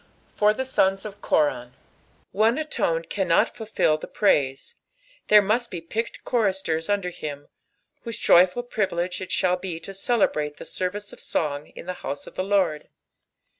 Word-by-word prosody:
For 210 0 +4
the 260 +5 -2
Sods 195 -6 +1
o( 215 - -4
Korab. 135 -10 0 0.6
One 220 +6 +3
alone 170 - -1
cannot 180 -2 +1
futJU 210 -8 0
the - - -6
prtdM, 135 -10 +1 0.5
there 210 -1 +7
must 230 +4 0
be 175 - -5
picked 220 +8 -4
choristers 190 -8 0
under 200 -3 0
him, 145 -3 -7 0.5
whose 230 -2 -6
joiifal 185 +8 +4
privilege 185 -6 -1
it 185 - -6
shall 180 -1 +2
be 180 -3 -5
to 195 - -8
cdebraU 195 -8 0
the - - -8
ssrrice 200 +3 -4
cf - - -12
song 145 -1 -2
in - - -9
the 180 - -3
house 140 +1 -5
cf - - -11
the 185 - -2
Lord. 190 -6 +1
185 Hz, 160 wpm, -25 LUFS, 165-210 Hz, 0.6 s, there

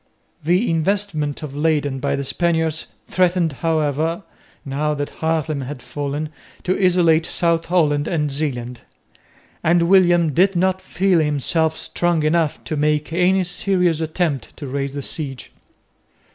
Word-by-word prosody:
The 180 +9 +2
investment 165 -3 -1
of 140 -2 -6
Leyden 145 -3 0
by 140 +1 0
the 140 - -3
Spaniards 160 +1 0 0.2
threatened 180 -3 +1
however, 160 +2 0 0.4
now 150 +2 -1
that 145 0 -4
Haarlem 160 -2 0
had 130 -1 -7
fallen, 145 +3 -4 0.3
to 185 - +1
isolate 170 -3 +4
South 170 -1 0
Holland 150 -4 +2
and 150 -4 -1
Zeeland; 125 -5 -3 0.8
and 170 +1 +3
William 175 -3 +4
did 190 +5 +3
not 185 +1 +1
feel 185 -2 +1
himself 155 +2 +1
strong 165 0 0
enough 155 -1 +1
to 155 - -3
make 150 +1 0
any 185 +2 +3
serious 180 -2 0
attempt 160 -3 -2
to 145 - -7
raise 140 +1 -3
the 140 - -4
siege. 135 -5 -5
160 Hz, 135 wpm, -20 LUFS, 145-175 Hz, 0.8 s, isolate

